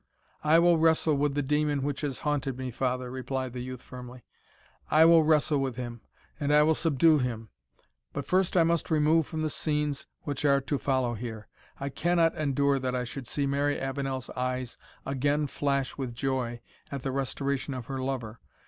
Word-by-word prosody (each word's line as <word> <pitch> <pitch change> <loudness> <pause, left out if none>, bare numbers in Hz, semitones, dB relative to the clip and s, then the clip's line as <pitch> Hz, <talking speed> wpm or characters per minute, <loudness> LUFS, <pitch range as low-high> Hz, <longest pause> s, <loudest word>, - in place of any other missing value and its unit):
"I 155 +2 +5
will 170 -1 +5
wrestle 160 -1 +3
with 140 0 0
the 145 - +1
demon 150 0 +1
which 145 -1 -2
has 140 -4 -2
haunted 140 -3 -1
me, 130 -1 -4
father," 125 0 -2
replied 130 -1 -3
the 125 - -4
youth, 130 0 -7
firmly 125 -1 -10 0.7
"I 155 +1 +6
will 165 0 +7
wrestle 150 -1 +3
with 135 -3 -2
him, 120 -2 -6 0.4
and 145 -1 0
I 150 0 +6
will 160 +1 +4
subdue 160 0 +3
him. 115 -4 -3 0.6
But - - -4
first 185 0 +2
I 170 - +6
must 170 0 +1
remove 155 0 +3
from 160 -2 -4
the 155 - 0
scenes 150 -2 -1 0.2
which 145 -1 -3
are 140 -1 +4
to 140 +1 -2
follow 130 -3 0
here. 110 -3 -6 0.3
I 140 - -3
cannot 165 +3 +2
endure 140 -2 +1
that 130 -1 -2
I 125 - 0
should 125 +1 -7
see 140 +2 -1
Mary 140 +1 0
Avenel's 135 -1 -3
eyes 125 -1 -3 0.3
again 145 +2 +1
flash 140 -1 -1
with 125 -3 -4
joy 125 -2 -2 0.3
at 140 -2 -5
the 135 - -1
restoration 135 +1 -2
of 125 -2 -6
her 135 +1 -4
lover. 125 -4 -4
140 Hz, 185 wpm, -28 LUFS, 130-150 Hz, 0.7 s, will